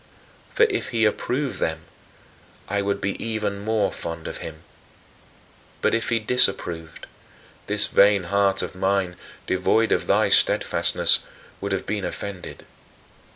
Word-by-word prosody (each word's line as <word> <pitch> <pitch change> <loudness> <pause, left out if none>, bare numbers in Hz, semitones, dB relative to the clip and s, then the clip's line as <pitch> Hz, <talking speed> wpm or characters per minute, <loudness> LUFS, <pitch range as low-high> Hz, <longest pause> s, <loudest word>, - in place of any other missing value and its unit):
For 480 - +2
if 410 -4 0
he 115 -2 +1
approved 130 +5 -1
them, 80 -1 -2 0.9
I 100 +1 -1
would 100 0 -2
be 100 0 -3
even 110 -3 -2
more 110 +1 0
fond 85 -1 -6
of - - -6
him; 80 0 -9 1.2
but - - +1
if 115 - 0
he 115 - +2
disapproved, 95 -8 0 0.6
this - - +6
vain 100 -1 +4
heart 100 +1 +1
of 90 - -5
mine, 95 -1 0 0.3
devoid 110 +5 +1
of - - +1
thy - - +3
steadfastness, - - +3 0.4
would 100 0 -4
have 95 - -2
been 105 -1 -3
offended. 95 -2 -6
100 Hz, 135 wpm, -23 LUFS, 95-110 Hz, 1.2 s, this